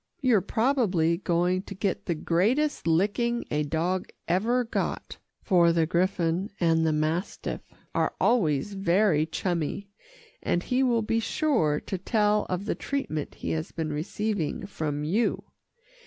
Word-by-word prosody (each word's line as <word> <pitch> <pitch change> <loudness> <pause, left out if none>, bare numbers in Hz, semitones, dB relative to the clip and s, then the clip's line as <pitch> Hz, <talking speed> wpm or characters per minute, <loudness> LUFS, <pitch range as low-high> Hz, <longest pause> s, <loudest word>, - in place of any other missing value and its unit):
You're 250 - +3
probably 205 - +1
going 180 0 +1
to 195 0 -9
get 195 0 -2
the 170 - 0
greatest 215 - +1
licking 210 +8 +1
a 150 - +1
dog 165 +5 -1 0.2
ever 225 +8 +2
got, 230 - -3 0.2
for 170 -3 +4
the 165 -1 +2
griffon 175 +2 0
and 165 -1 +3
the - - +3
mastiff 155 +5 -2 0.3
are - - 0
always 190 - +2
very 185 -4 +2
chummy, 175 +3 -2 0.5
and 175 - 0
he 255 +1 +1
will 240 -4 +2
be 225 +1 +1
sure 225 - +1
to 190 - -4
tell 210 +1 +1
of 185 +2 -2
the - - 0
treatment 215 - -3
he - - -4
has 160 +1 -3
been 155 -2 -3
receiving 195 +3 -2
from 150 -6 -3
you. 200 +10 0
185 Hz, 140 wpm, -27 LUFS, 165-220 Hz, 0.5 s, for